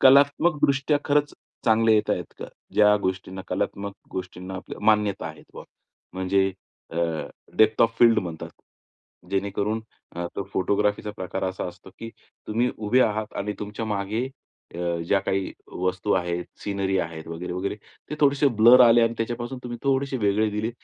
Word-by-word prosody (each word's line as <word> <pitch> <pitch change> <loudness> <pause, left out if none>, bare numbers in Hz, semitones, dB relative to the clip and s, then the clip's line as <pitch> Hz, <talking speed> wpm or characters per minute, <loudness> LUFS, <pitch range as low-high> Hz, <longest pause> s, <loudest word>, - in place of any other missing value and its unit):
कलात्मकदृष्ट्या 140 +1 +4
खरंच 145 0 +2 0.3
चांगले 110 0 +4
येत 105 0 +1
आहेत 90 -3 -2
का? - - -6 0.3
ज्या 105 0 +6
गोष्टींना 95 0 -3
कलात्मक 100 0 -2 0.2
गोष्टींना 90 0 -6
आपल्या 95 - -8
मान्यता 105 -5 +2
आहेत 80 -1 -10
बा - - -8 0.5
म्हणजे 95 +1 +1 0.4
अ, 80 - -7 0.6
डेप्थ 110 0 +4
ऑफ 115 0 +2
फील्ड 115 -1 +6
म्हणतात. 85 -3 -5 0.8
जेणेकरून 100 +2 -1 0.4
अ, 85 0 -2
तो - - -1
फोटोग्राफीचा 105 +2 0
प्रकार 95 -1 -3
असा 95 0 -3
असतो, 90 - -13
की 115 - -6 0.4
तुम्ही 120 +3 +1
उभे 110 +4 +2
आहात 110 0 -1
आणि 105 +1 -2
तुमच्या 105 +2 -4
मागे 105 +3 -1 0.5
अ, - - -6 0.3
ज्या 100 - +3
काही 95 0 -2 0.3
वस्तू 95 +2 0
आहेत, 90 -1 0 0.2
सीनरी 100 -1 -1
आहेत 80 -2 -4
वगैरे-वगैरे, 90 +4 -3 0.4
ते - - -2
थोडेसे 140 0 +4
ब्लर 120 +3 +9
आले 120 -1 +7
आणि 115 0 +2
त्याच्यापासून 120 +3 -3
तुम्ही 120 -1 -6
थोडेसे 135 0 +1
वेगळे 105 0 +2
दिले, 105 +3 -2
105 Hz, 150 wpm, -25 LUFS, 95-115 Hz, 0.8 s, ब्लर